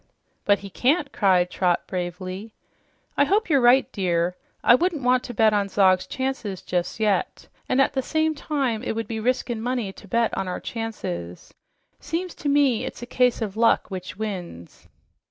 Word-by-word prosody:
"But 205 -1 +4
he 195 - -9
can't!" 280 - +1
cried 180 -3 +3
Trot 180 -2 +1
bravely. 185 +3 -5 0.6
"I 285 - +4
hope 400 +4 +1
you're 275 -3 +4
right, 245 +2 +6
dear. 180 -2 0 0.3
I - - +7
wouldn't 315 +1 +1
want 250 0 +3
to 245 - -6
bet 215 0 +4
on 200 -1 +1
Zog's 185 -1 +3
chances 260 -7 -3
jes' 180 +3 -2
yet, 210 -3 0 0.2
an' 255 - +2
at 270 - +3
the 265 - 0
same 315 +4 0
time 275 -7 -2
it - - -2
would 225 -1 -4
be 220 0 -4
riskin' 240 -1 -1
money 240 -5 -2
to 200 - -14
bet 230 +3 +1
on 195 - -2
our 180 - -3
chances. 90 - -6 0.5
Seems 335 +4 -4
to 290 - 0
me 280 -5 +3
it's - - -6
a - - -4
case 250 -1 +1
of 205 -2 -5
luck 230 -2 +2
which 185 -1 -6
wins." 180 - -7
225 Hz, 180 wpm, -24 LUFS, 185-260 Hz, 0.6 s, I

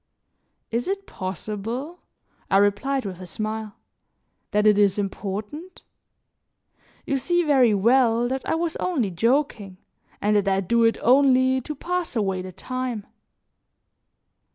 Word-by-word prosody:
"Is 235 +1 -1
it 390 +1 -2
possible," 220 - -5 0.5
I 195 - +4
replied 205 +7 +1
with 185 -2 -6
a 185 - -8
smile, 215 +3 -5 0.7
"that 210 +1 +1
it 210 -1 +5
is 200 -1 +3
important? 210 - -5 1.2
You 275 - 0
see 350 +6 +1
very 260 -8 +4
well, 235 +2 +3
that 265 +1 -2
I - - +2
was 330 0 -2
only 265 - -1
joking, 220 - 0 0.4
and 210 +1 +1
that 200 -1 0
I 195 0 +2
do 230 +5 +2
it 225 - +2
only 260 0 +4
to 300 +5 -6
pass 355 +2 -3
away 195 -4 0
the 185 0 -7
time." 255 +1 -4
230 Hz, 130 wpm, -24 LUFS, 205-270 Hz, 1.2 s, it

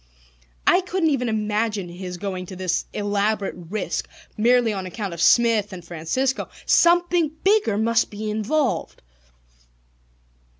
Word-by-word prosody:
I 365 - +5
couldn't 360 -3 0
even 250 -4 0
imagine 215 -2 -1
his 180 +1 -7
going 185 -1 -5
to 185 - -8
this 180 -2 -1
elaborate 205 0 -1
risk 180 +4 -4 0.3
merely 235 0 +3
on 190 -2 -4
account 195 -1 -5
of 170 - -5
Smith 225 -2 +4
and 180 -2 -9
Francisco. 175 +11 -2 0.2
Something 345 -1 +4
bigger 390 - +3
must 230 +1 +2
be 215 +1 -6
involved. 235 - -1
215 Hz, 125 wpm, -23 LUFS, 190-250 Hz, 0.3 s, I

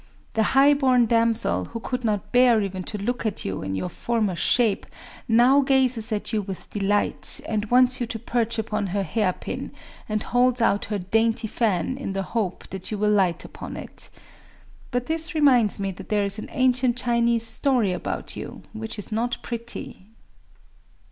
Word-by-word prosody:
The 220 - +1 0.2
high 280 +2 +7
born 260 -4 +3
damsel, 230 - +2
who 230 - -7
could 250 +2 -4
not 210 -2 -1
bear 245 -2 +5
even 195 -2 -3
to 210 - -3
look 245 +5 -2
at 220 -3 -2
you 95 -1 -3
in 95 0 -3
your 95 - -2
former 215 +1 -1
shape, 225 +3 +2 0.4
now 245 +4 +5
gazes 260 -5 +2
at 215 +2 -2
you 215 - +1
with 190 -2 -8
delight, 205 0 +1
and 215 -1 -2
wants 255 +1 +4
you 240 - -1
to 230 -1 -4
perch 230 0 -1
upon 215 -2 -2
her 195 +2 -1
hairpin, 195 -2 -2 0.4
and 215 0 -1
holds 245 0 +2
out 205 -3 +2
her 210 - -2
dainty 225 +4 +1
fan 220 +2 0
in 195 - -4
the 195 0 -2
hope 200 -3 -3
that 190 -1 -5
you 215 - -3
will 210 +1 +2
light 185 -4 +1
upon - - -8
it. - - -8 0.8
But 245 -1 -2
this 325 +3 -1
reminds 255 -8 +4
me 195 -1 -1
that 180 - -11
there 210 -1 +2
is 200 +1 -1
an - - -7
ancient 255 -1 +2
Chinese 235 -2 +1
story 230 -2 +1
about 180 - -4
you, - - -8
which 220 0 -6
is 205 - -7
not 235 +3 -1
pretty. 235 -4 -6
225 Hz, 180 wpm, -24 LUFS, 205-245 Hz, 0.8 s, high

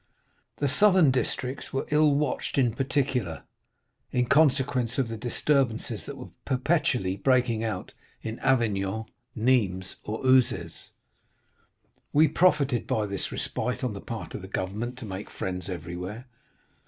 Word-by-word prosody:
The 145 - +1
southern 185 0 +5
districts 130 +1 -2
were 135 - -1
ill 150 -1 +5
watched 145 -1 -1
in 125 -4 +3
particular, 130 - -1 0.7
in 125 0 +2
consequence 135 -4 +2
of 130 -4 +1
the 115 - -4
disturbances 120 +1 0
that - - -6
were - - -9
perpetually 130 - +1
breaking 125 -1 +2
out 110 -1 -4 0.3
in 110 +1 -5
Avignon, 110 -4 +1 0.3
Nîmes, 110 -6 +1
or 110 +4 -5
Uzès. 120 -10 +2 1.2
We 155 +2 +6
profited 145 - +2
by 110 - +1
this 100 -2 -4
respite 125 +2 -3
on 125 -4 -1
the 100 - -7
part 115 -2 -6
of - - -5
the 95 - -8
government 105 +6 -3
to 125 - -7
make 95 0 -6
friends 90 +1 -4
everywhere. 90 +6 -6
125 Hz, 135 wpm, -27 LUFS, 105-135 Hz, 1.2 s, We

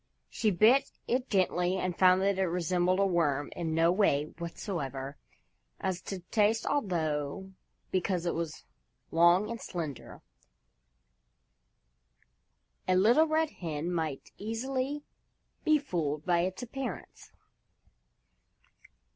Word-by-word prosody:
She 220 - +1
bit 235 +9 +4 0.2
it 250 +2 0
gently 185 -2 +1
and 185 -2 -2
found 185 +1 +5
that 195 -1 +1
it 190 - +3
resembled 180 +2 +1
a 200 - +4
worm 150 -6 +1
in 160 -2 -2
no 165 +1 +4
way 155 -7 +2
whatsoever 140 - -4 0.6
as 185 -2 -2
to 195 -2 -6
taste 220 +1 +2
although 170 - -1 0.4
because 185 -1 0
it 170 - 0
was 165 -2 -4 0.5
long 175 +6 +4
and 235 - -6
slender, 160 -6 -6 2.6
a 185 - +3
Little 235 +12 +5
Red 315 0 +1
Hen 165 0 -4
might 160 -5 -3
easily 260 +6 -3 0.6
be 310 -1 +5
fooled 160 - -3
by 175 -2 +3
its 185 +6 -2
appearance. 265 +2 -7
185 Hz, 115 wpm, -30 LUFS, 165-215 Hz, 2.6 s, found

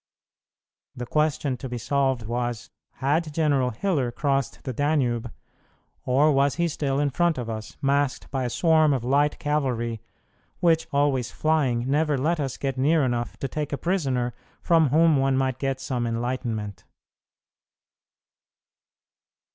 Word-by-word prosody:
The 125 - -5
question 150 -1 0
to 130 - -7
be 120 - -4
solved 130 0 0
was, 120 -1 -3 0.2
Had 150 +4 0
General 145 -5 +1
Hiller 130 - -1
crossed 135 0 -1
the 130 - -4
Danube, 125 -4 0 0.8
or 140 +5 +4
was 140 0 +2
he 170 0 +1
still 140 -3 -1
in 145 -1 +1
front 170 +2 +1
of 120 -2 -4
us, 110 -1 -7
masked 140 -1 0
by 135 -3 -1
a - - -1
swarm 155 +2 +3
of 130 -4 -1
light 140 +4 +2
cavalry, 125 -7 -1 0.6
which, 165 -2 +2
always 140 -4 +1
flying, 135 -7 0
never 150 +1 +1
let 160 +5 0
us 135 -3 -3
get 135 -2 -3
near 150 +3 +3
enough 120 -1 -2
to 135 - -3
take 150 +2 -4
a 140 - -1
prisoner 135 -10 -1 0.3
from 165 -4 +3
whom 160 +2 +4
one 135 0 +2
might 130 -1 0
get 135 -1 -1
some 125 -3 -2
enlightenment? 115 -4 -3
135 Hz, 145 wpm, -25 LUFS, 125-150 Hz, 0.8 s, or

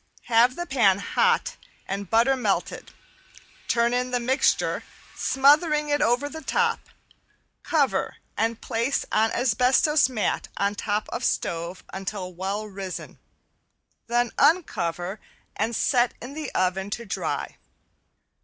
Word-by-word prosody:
Have 240 +2 +4
the 345 - -4
pan 235 - +3
hot 470 - +1 0.3
and 195 -1 -4
butter 235 +4 +4
melted, 215 -7 -2 0.8
turn 235 0 +2
in 250 0 0
the 250 0 0
mixture, 255 +3 +1 0.3
smothering 300 +2 +3
it 290 0 +1
over 245 +5 +2
the 315 +2 -8
top, 460 +6 +1 0.8
cover 295 -4 0 0.2
and 225 0 0
place 235 +5 -1
on 220 +1 +2
asbestos 255 +5 +3
mat 225 -5 -1
on 200 +1 +1
top 210 +1 -2
of - - -4
stove 170 +2 -2
until 190 -1 -5
well 195 +4 -3
risen, 195 -3 -7 0.9
then 240 0 +1
uncover 190 - +1 0.4
and 225 +2 -1
set 245 -2 +2
in 250 +4 -8
the 305 -2 -5
oven 185 +1 0
to 235 +3 -5
dry. 195 - -3
235 Hz, 125 wpm, -25 LUFS, 200-270 Hz, 0.9 s, Have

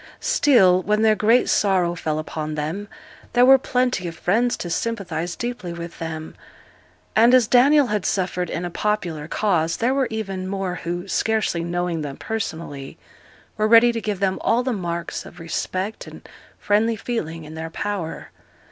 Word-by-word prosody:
Still, 215 - +4
when 210 +3 +1
their 220 -1 +5
great 225 +3 +3
sorrow 185 -4 +2
fell 155 -3 -2
upon 155 0 -4
them, 160 +7 -3 0.5
there 245 +1 +6
were 265 +1 +7
plenty 250 -8 0
of 165 -1 -7
friends 235 +7 +1
to 175 - -5
sympathize 175 -6 -2
deeply 240 -8 -4
with 170 0 -8
them; 160 -1 -5 0.8
and, 235 +3 +6
as 250 -3 +5
Daniel 275 +5 +5
had 210 -4 -1
suffered 180 -3 -1
in 175 - -3
a 175 - -4
popular 175 -7 -2
cause, 165 -5 0
there 240 +3 +1
were 270 -2 +1
even 195 -4 -4
more 195 -1 -2
who, 175 +2 -3
scarcely 215 -5 0
knowing 175 -1 -2
them 140 -2 -6
personally, 160 -10 -5 0.6
were 215 0 +2
ready 230 +2 +7
to 230 -1 -4
give 210 -3 -3
them 190 -1 0
all 240 +2 +2
the 255 -1 -1
marks 170 -4 -4
of 175 - -13
respect 185 +5 -4
and - - -12 0.3
friendly 220 +3 +1
feeling 165 -8 -4
in 155 +1 -10
their 160 0 -5
power. 190 -1 -4
190 Hz, 165 wpm, -22 LUFS, 170-225 Hz, 0.8 s, were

